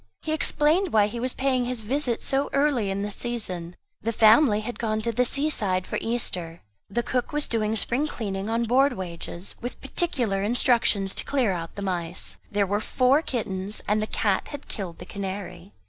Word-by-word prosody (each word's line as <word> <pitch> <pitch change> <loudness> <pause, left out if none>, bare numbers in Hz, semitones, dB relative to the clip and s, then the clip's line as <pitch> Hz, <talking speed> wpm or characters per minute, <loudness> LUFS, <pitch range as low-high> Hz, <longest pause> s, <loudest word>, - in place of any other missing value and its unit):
He 310 - -2
explained 315 +4 +2
why 210 -2 +5
he 225 +3 -4
was 255 +1 -2
paying 260 -2 +1
his 245 -2 -2
visit 245 +1 0
so 275 +1 +1
early 275 -7 +2
in 195 +1 -2
the 205 - -3
season; 185 -8 -4 0.3
the 230 - -1
family 220 0 +5
had 240 +3 -6
gone 215 -2 0
to 235 - 0
the 250 +2 +2
sea 280 +4 +1
side 185 -10 +1
for - - -2
Easter; 180 -8 -3 0.3
the 240 +4 -1
cook 250 +1 -1
was 295 0 +1
doing 220 -1 0
spring 245 +7 0
cleaning, 200 -6 -4
on 230 +1 +1
board 265 +5 +4
wages, 175 0 -6
with 245 - -5
particular 255 - 0
instructions 220 -3 +3
to - - -2
clear 260 -7 +1
out 165 -2 -5
the 200 - -5
mice. 175 -3 -2
There 205 0 +2
were 205 +2 0
four 255 +6 +3
kittens, 205 -7 -2
and 210 +1 +2
the 215 - -1
cat 200 -3 0
had 290 -1 -8
killed 180 -5 -5
the 180 - -9
canary. 195 -1 -6
220 Hz, 195 wpm, -26 LUFS, 195-255 Hz, 0.3 s, why